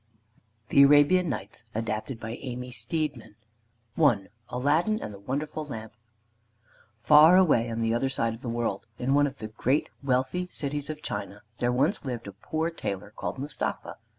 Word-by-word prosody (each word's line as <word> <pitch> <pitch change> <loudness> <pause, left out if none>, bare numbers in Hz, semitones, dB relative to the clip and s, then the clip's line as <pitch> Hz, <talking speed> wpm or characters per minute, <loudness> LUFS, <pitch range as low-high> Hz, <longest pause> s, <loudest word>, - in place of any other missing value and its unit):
THE 140 - +6
ARABIAN 145 +5 +5
NIGHTS 110 -4 -5
ADAPTED 110 +2 -3
BY 115 0 -5
AMY 125 -1 -6
STEEDMAN 120 0 -3 0.6
I 120 -11 +4 0.2
ALADDIN 155 - +1
AND 105 - -6
THE 100 - -10
WONDERFUL 150 +8 -3
LAMP 110 -6 -7 1.0
Far 150 +9 +7
away 145 -11 +4
on 115 0 -3
the 115 0 +1
other 135 +3 +1
side 115 -4 0
of 115 - -10
the 120 - -4
world, 115 -2 -2
in 130 +2 0
one 145 0 +4
of 135 0 -8
the 110 0 -6
great 130 +6 0
wealthy 135 +7 0
cities 145 -3 -3
of 155 -1 -6
China, 100 0 -5 0.2
there 120 0 +1
once 145 +11 +1
lived 125 -4 -4
a 100 - -6
poor 160 - -3
tailor 100 - -5
called - - -4
Mustapha. 140 +1 -4
130 Hz, 165 wpm, -27 LUFS, 115-150 Hz, 1.0 s, Far